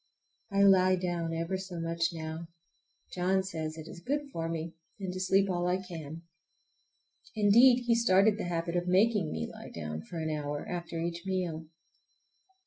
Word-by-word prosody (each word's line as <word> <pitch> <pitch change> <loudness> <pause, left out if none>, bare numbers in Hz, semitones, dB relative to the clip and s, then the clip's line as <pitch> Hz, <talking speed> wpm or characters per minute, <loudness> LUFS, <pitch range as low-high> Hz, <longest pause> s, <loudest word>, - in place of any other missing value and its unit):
I 200 0 +3
lie 185 -1 +6
down 175 -2 -2
ever 165 +3 -2
so 185 -2 -6
much 165 0 -1
now. 160 0 -6 0.7
John 185 +1 +1
says 160 -4 -4
it 160 0 -8
is 175 - -9
good 285 +7 -2
for 165 0 -2
me, 165 0 -4 0.3
and 190 -2 -4
to 185 - -5
sleep 195 +1 +3
all 175 -2 0
I 180 +1 +2
can. 165 -4 -8 1.1
Indeed, 240 +4 +6
he 235 - +4
started 215 -2 +4
the - - -2
habit 170 -1 -2
by 175 - +2
making 195 -1 +3
me 80 -1 -2
lie - - -10
down 75 -1 -5
for 170 - -9
an 160 -1 -2
hour 145 -1 -3
after 170 -1 -4
each 170 +1 -3
meal. 175 -4 -2
175 Hz, 170 wpm, -30 LUFS, 165-190 Hz, 1.1 s, lie